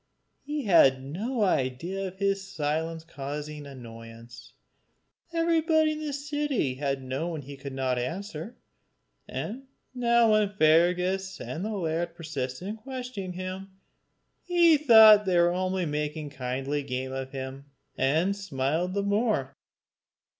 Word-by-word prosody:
He 295 0 -4
had 135 - +5
no 210 - -2
idea 175 +4 -1
of 185 0 -10
his 195 0 0
silence 160 +1 -2
causing 150 -1 -6
annoyance. 115 -1 -11 0.8
Everybody 325 -2 +2
in 305 - -4
the 305 -1 -3
city 285 - -1
had 135 0 -2
known 145 +4 -3
he 140 +2 -9
could 140 0 -8
not 130 -2 0
answer; 180 - -5 0.7
and 260 +6 -5 0.3
now 235 -2 +3
when 215 -1 +3
Fergus 180 +4 +3
and 165 - -5
the 215 0 -3
laird 170 -1 -2
persisted 155 -1 -5
in 215 +2 -4
questioning 250 -6 -6
him, 185 +1 -7 0.6
he 345 -2 +5
thought 220 -7 +8
they 185 -2 +2
were 180 +1 +2
making 150 0 -3
kindly 135 +2 -3
game 130 -1 -4
of 135 0 -4
him, 135 0 -6 0.3
and 160 +9 +1
smiled 175 0 -2
the 200 - 0
more. 200 - 0
175 Hz, 125 wpm, -27 LUFS, 140-210 Hz, 0.8 s, thought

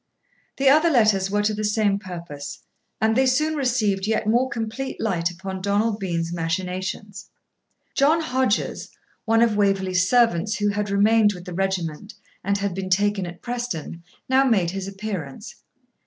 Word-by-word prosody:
The 275 - +1
other 310 +5 +6
letters 215 -8 +3
were 205 +1 +1
to 215 +1 +1
the 215 +1 -3
same 210 -1 +1
purpose; 170 -7 -8 0.4
and 220 0 +2
they 265 +1 +3
soon 305 +5 +2
received 220 -8 0
yet 220 -1 0
more 240 +4 +2
complete 235 +3 -4
light 175 -6 0
upon 190 +2 -6
Donald 205 +2 0
Bean's 170 -3 -2
machinations. 185 +4 -4 0.6
John 300 +4 +3
Hodges, 255 -7 -1 0.4
one 225 +1 +4
of 225 -3 +2
Waverley's 190 -2 +1
servants, 220 -5 +3
who 205 0 0
had 205 0 -2
remained 210 +1 +4
with 180 -1 -10
the 180 - -7
regiment 190 0 -3 0.3
and 200 +1 +1
had 200 -1 -2
been 190 +1 -4
taken 200 0 +1
at 175 0 -10
Preston, 235 -9 -4 0.3
now 260 +1 +4
made 200 -10 +2
his 195 0 -5
appearance. 195 - -6
205 Hz, 155 wpm, -23 LUFS, 185-225 Hz, 0.6 s, other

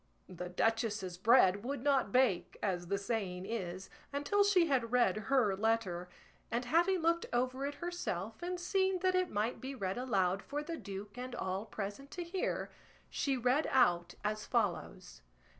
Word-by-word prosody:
The 180 -1 -6
duchess's 210 -2 0
bread 205 -2 +5
would 270 0 -3
not 275 -7 +2
bake, 245 -8 +2
as 180 -3 -1
the 200 +2 0
saying 195 -3 -3
is, 190 -4 -4 0.2
until 290 +9 +2
she 395 -4 +4
had 255 -7 +1
read 240 -6 +3
her 245 -8 +3
letter; 195 -5 0 0.4
and 235 +2 -1
having 345 +7 +3
looked 335 +1 +2
over 255 +3 0
it 285 - -5
herself 230 - -4
and 355 +1 -3
seen 380 +1 +1
that 370 0 +3
it 365 -1 +2
might 215 +4 -1
be 270 +1 -5
read 195 -2 -2
aloud 195 -6 +1
for 295 +1 -4
the 330 +2 -4
duke 205 +1 -7
and 255 0 -5
all 190 +4 -3
present 210 +7 -5
to 350 - -2
hear, 360 +2 -2 0.4
she 275 -2 0
read 250 +5 +2
out 175 -9 +3
as 215 0 -1
follows. 180 - -2
230 Hz, 165 wpm, -34 LUFS, 195-280 Hz, 0.4 s, bread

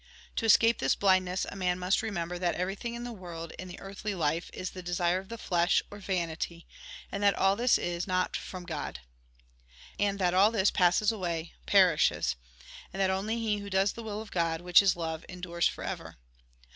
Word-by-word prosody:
To - - 0
escape 225 +1 +5
this 135 - +2
blindness, 185 -1 +2
a - - -7
man 180 -2 0
must 185 +1 +1
remember 175 -4 -3
that 175 -1 0
everything 195 +6 -3
in 240 - -6
the 245 - -5
world, 170 -5 -8
in 185 - -6
the 180 - -9
earthly 200 +1 -5
life, 165 0 -1
is 185 - -5
the 185 - -8
desire 175 0 0
of 190 +1 -12
the 230 - -6
flesh, 175 -5 +2
or 205 - -9
vanity, 170 -3 -3 0.5
and 200 - -3
that 200 -1 +4
all 195 +1 +3
this 240 +3 +3
is 175 +1 -3
not 185 -1 0
from 185 -1 -6
God. 150 - -5 1.0
And 200 -1 +1
that 180 -2 +1
all 195 +3 +6
this 210 -3 +2
passes 190 +3 +3
away, 175 -6 -3
perishes. 180 - +4 0.6
And 195 - -7
that 190 -1 +3
only 205 +4 -1
he 215 -3 0
who 200 0 -7
does 190 +1 +2
the 235 - -8
will 215 -1 -5
of 220 - -15
God, 165 -2 0
which 175 +1 +6
is 195 -2 +3
love, 160 -2 -4
endures 175 -2 -1
for - - -6
ever. - - -6
185 Hz, 200 wpm, -29 LUFS, 175-200 Hz, 1.0 s, all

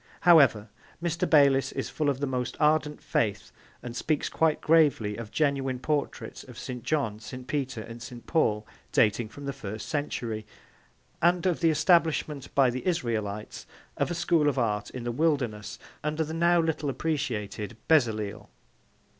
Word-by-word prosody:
However, 140 -12 +6 0.3
Mr. 170 0 -1
Bayliss 140 -3 +5
is - - -4
full 150 -2 0
of 135 -2 -1
the - - +1
most 125 -2 -3
ardent 150 -1 +2
faith 105 -2 -1 0.3
and 120 -1 -6
speaks 150 +2 -1
quite 160 -2 +1
gravely 145 -10 +3
of 115 -1 -7
genuine 135 -2 0
portraits 145 +3 -3
of - - -13
St. 125 -1 -6
John, 125 -9 -1
St. 125 +3 -8
Peter 135 -4 -2
and 115 +2 -9
St. 120 0 -9
Paul 105 -10 +1 0.3
dating 110 +1 +2
from 145 +5 -10
the 140 - -3
first 110 -5 -7
century, 120 -8 -3 0.8
and 175 +2 +3
of 180 -3 +1
the 165 - +3
establishment 155 -3 +2
by 135 -3 +5
the 130 +8 -5
Israelites 110 - -2 0.3
of - - 0
a 175 - -2
school 165 -3 +2
of 140 - -3
art 105 -4 0
in 125 - -7
the 120 - -2
wilderness 125 -7 -1 0.3
under 155 +1 0
the 160 +1 -6
now 170 +1 +3
little 160 -3 0
appreciated 120 -7 -3
Bezaleel. 110 -9 +1
135 Hz, 160 wpm, -28 LUFS, 115-155 Hz, 0.8 s, However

